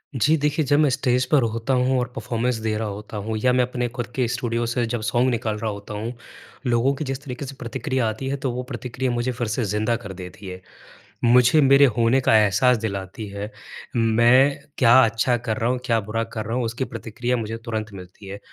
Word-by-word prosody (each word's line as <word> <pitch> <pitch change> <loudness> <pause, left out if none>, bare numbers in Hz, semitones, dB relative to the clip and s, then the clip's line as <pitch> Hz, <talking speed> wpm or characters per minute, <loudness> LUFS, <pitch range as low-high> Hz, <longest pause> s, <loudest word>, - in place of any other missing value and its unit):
जी। 150 +6 +3
देखिए 150 +1 0
जब 145 +3 +3
मैं 150 -2 +4
स्टेज़ 125 -1 +1
पर 145 -3 +5
होता 115 +3 -1
हूँ 130 +1 +2
और 125 - -1
परफ़ॉर्मेंस 120 +1 -1
दे 110 -1 -1
रहा 110 -1 -2
होता 105 +1 -7
हूँ 110 -1 -1
या 125 -1 +4
मैं 125 0 +3
अपने 125 0 -2
खुद 120 0 -5
के 125 -3 +1
स्टूडियो 120 -1 -1
से 120 +1 0
जब 115 -1 -3
सॉन्ग 120 +4 +1
निकाल 110 -3 -1
रहा 110 0 -2
होता 100 +1 -8
हूँ 110 +4 -4 0.5
लोगों 120 +3 +2
की 155 - -4
जिस 135 +2 -4
तरीके 135 0 -6
से 135 +1 -8
प्रतिक्रिया 125 0 -2
आती 120 +5 -5
है, 140 +1 -1
तो 130 -1 -2
वो 125 +1 -4
प्रतिक्रिया 125 0 -4
मुझे 120 +1 -1
फ़िर 120 -1 -3
से 110 +3 -1
ज़िंदा 105 +3 0
कर 110 -5 -7
देती 95 +2 -10
है। 90 0 -8 0.6
मुझे 125 +5 +5
मेरे 140 +1 +6
होने 115 +3 +3
का 110 - +4
एहसास 110 +4 +4
दिलाती 100 0 -5
है। 100 +2 -6 0.4
मैं 120 +4 +4 0.2
क्या 120 -2 +5
अच्छा 115 +2 +1
कर 115 -2 -3
रहा 115 - 0
हूँ 125 0 0
क्या 115 -3 +2
बुरा 115 +3 -2
कर 110 - -3
रहा 115 +2 -3
हूँ 125 - 0
उसकी 120 +3 -3
प्रतिक्रिया 120 +2 -3
मुझे 115 0 -4
तुरंत 110 -2 -3
मिलती 95 +1 -12
है। 100 +1 -7
120 Hz, 225 wpm, -23 LUFS, 110-125 Hz, 0.6 s, मेरे